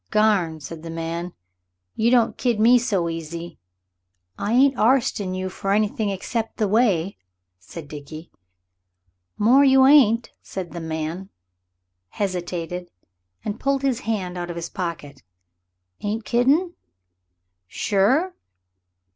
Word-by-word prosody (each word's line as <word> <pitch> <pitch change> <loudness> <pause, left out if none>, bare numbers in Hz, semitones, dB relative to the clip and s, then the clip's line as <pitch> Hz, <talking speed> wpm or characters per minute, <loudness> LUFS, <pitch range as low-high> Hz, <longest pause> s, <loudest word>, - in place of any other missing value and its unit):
"Garn!" 200 -7 +2
said 160 +2 -8
the 165 - -8
man; 165 +2 -4 0.6
"you 225 +2 +1
don't 240 -2 +3
kid 240 -4 0
me 240 +3 +6
so 200 -8 0
easy." 165 +1 -6 0.8
"I 205 - -3
ain't 265 +3 +4
arstin' 220 -5 +1
you 185 0 -3
for 195 +1 -2
anything 210 0 0
except 220 +4 -3
the 215 - +1
way," 200 -4 +1 0.4
said 145 - -10
Dickie. 155 +2 -10 1.1
"More 250 +7 +5
you 265 -1 +6
ain't," 245 -5 +5
said 185 -3 -6
the 170 - -6
man, 160 +4 -4 0.8
hesitated, 180 - -4 0.6
and 210 0 -4
pulled 275 0 0
his 260 -3 +1
hand 190 -7 -3
out 175 0 -5
of 175 - -5
his 170 0 -5
pocket. 170 -7 -6 0.8
"Ain't 215 +2 -3
kiddin'? 285 +9 +2 0.9
Sure? 245 - +1
200 Hz, 120 wpm, -23 LUFS, 170-235 Hz, 1.1 s, me